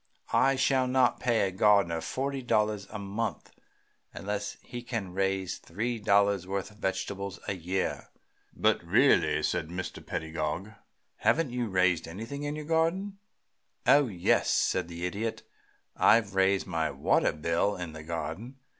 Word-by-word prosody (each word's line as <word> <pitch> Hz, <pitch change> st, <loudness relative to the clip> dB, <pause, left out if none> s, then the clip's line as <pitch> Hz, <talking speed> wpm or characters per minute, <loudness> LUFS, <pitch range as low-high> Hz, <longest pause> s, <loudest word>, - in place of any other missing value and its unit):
I 135 Hz, 0 st, +4 dB
shall 130 Hz, 0 st, +2 dB
not 125 Hz, -1 st, +3 dB
pay 120 Hz, -4 st, +2 dB
a -, -, -4 dB
gardener 95 Hz, -4 st, +3 dB
forty 135 Hz, +9 st, -3 dB
dollars 105 Hz, -4 st, 0 dB
a 105 Hz, -, -6 dB
month 105 Hz, +3 st, -4 dB, 0.6 s
unless 105 Hz, +1 st, -4 dB
he 120 Hz, -, -7 dB
can 115 Hz, -7 st, -4 dB
raise 95 Hz, -1 st, -1 dB
three 115 Hz, +7 st, -3 dB
dollars' 100 Hz, -2 st, +3 dB
worth 100 Hz, +1 st, -3 dB
of 105 Hz, -, -19 dB
vegetables 100 Hz, 0 st, -3 dB
a -, -, 0 dB
year." 95 Hz, +1 st, -3 dB, 0.4 s
"But -, -, +1 dB
really," 75 Hz, 0 st, +3 dB
said 80 Hz, +1 st, 0 dB
Mr. 90 Hz, +1 st, -6 dB
Pedagog, 80 Hz, +5 st, -3 dB, 0.5 s
"haven't 160 Hz, -5 st, +2 dB
you 120 Hz, -1 st, -1 dB
raised 90 Hz, -3 st, +2 dB
anything 115 Hz, +11 st, -6 dB
in 145 Hz, 0 st, -3 dB
your 150 Hz, -1 st, -6 dB
garden?" 170 Hz, +5 st, 0 dB, 0.7 s
"Oh 145 Hz, -1 st, +6 dB
yes," 90 Hz, -6 st, +1 dB
said -, -, +1 dB
the 85 Hz, +1 st, -5 dB
Idiot. 110 Hz, +5 st, -3 dB, 0.5 s
"I've 110 Hz, -3 st, +4 dB
raised 95 Hz, 0 st, +2 dB
my 80 Hz, -3 st, -1 dB
water -, -, +2 dB
bill 85 Hz, +6 st, 0 dB
in 90 Hz, -3 st, -6 dB
the 80 Hz, -, -8 dB
garden. 85 Hz, -, -5 dB
100 Hz, 145 wpm, -29 LUFS, 90-120 Hz, 0.7 s, Oh